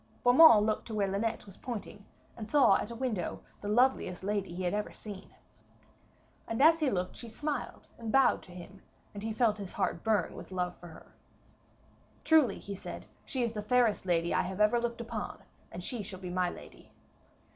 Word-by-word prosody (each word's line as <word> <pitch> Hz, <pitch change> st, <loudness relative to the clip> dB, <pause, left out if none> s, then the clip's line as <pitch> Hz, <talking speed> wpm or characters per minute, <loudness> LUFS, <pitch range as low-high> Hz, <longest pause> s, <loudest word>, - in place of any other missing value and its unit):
Beaumains 245 Hz, -4 st, +8 dB
looked 215 Hz, -1 st, -1 dB
to 225 Hz, -, -5 dB
where 200 Hz, -2 st, +1 dB
Linet 220 Hz, +4 st, -2 dB
was 195 Hz, -2 st, -13 dB
pointing, 210 Hz, -4 st, -7 dB, 0.3 s
and 215 Hz, -2 st, -8 dB
saw 250 Hz, -7 st, +5 dB
at -, -, -4 dB
a 235 Hz, -, -7 dB
window 230 Hz, -8 st, -3 dB, 0.2 s
the -, -, -5 dB
loveliest 215 Hz, -5 st, +2 dB
lady 200 Hz, -2 st, -2 dB
he 180 Hz, +2 st, -5 dB
had 180 Hz, -, 0 dB
ever 210 Hz, 0 st, -2 dB
seen. 200 Hz, -3 st, -10 dB, 1.1 s
And 225 Hz, -, -3 dB
as 320 Hz, +3 st, +6 dB
he 300 Hz, -4 st, +2 dB
looked 180 Hz, -4 st, -2 dB
she 235 Hz, -, -8 dB
smiled 290 Hz, +3 st, -4 dB
and 225 Hz, -2 st, -4 dB
bowed 270 Hz, +2 st, +4 dB
to 180 Hz, -, -15 dB
him, 180 Hz, +2 st, -11 dB, 0.3 s
and 205 Hz, -, -7 dB
he 220 Hz, +1 st, -3 dB
felt 220 Hz, -1 st, +1 dB
his 195 Hz, -2 st, -7 dB
heart -, -, -1 dB
burn 215 Hz, -6 st, +1 dB
with -, -, -10 dB
love 180 Hz, -1 st, -2 dB
for 175 Hz, -, -11 dB
her. 160 Hz, -, -15 dB, 1.1 s
'Truly,' 315 Hz, -5 st, +4 dB
he 200 Hz, -, -7 dB
said, 195 Hz, -, -8 dB, 0.2 s
'she 260 Hz, -2 st, -2 dB
is 235 Hz, -, 0 dB
the 215 Hz, -2 st, -4 dB
fairest 225 Hz, -3 st, +2 dB
lady 170 Hz, -1 st, +1 dB
I -, -, +3 dB
have 190 Hz, +2 st, -5 dB
ever 215 Hz, +3 st, +4 dB
looked 235 Hz, 0 st, -3 dB
upon, 235 Hz, -, -5 dB, 0.3 s
and 175 Hz, +1 st, -7 dB
she 235 Hz, +3 st, -4 dB
shall 190 Hz, -2 st, -8 dB
be 180 Hz, -2 st, -6 dB
my 180 Hz, 0 st, +1 dB
lady.' -, -, -12 dB
210 Hz, 200 wpm, -31 LUFS, 190-240 Hz, 1.1 s, Beaumains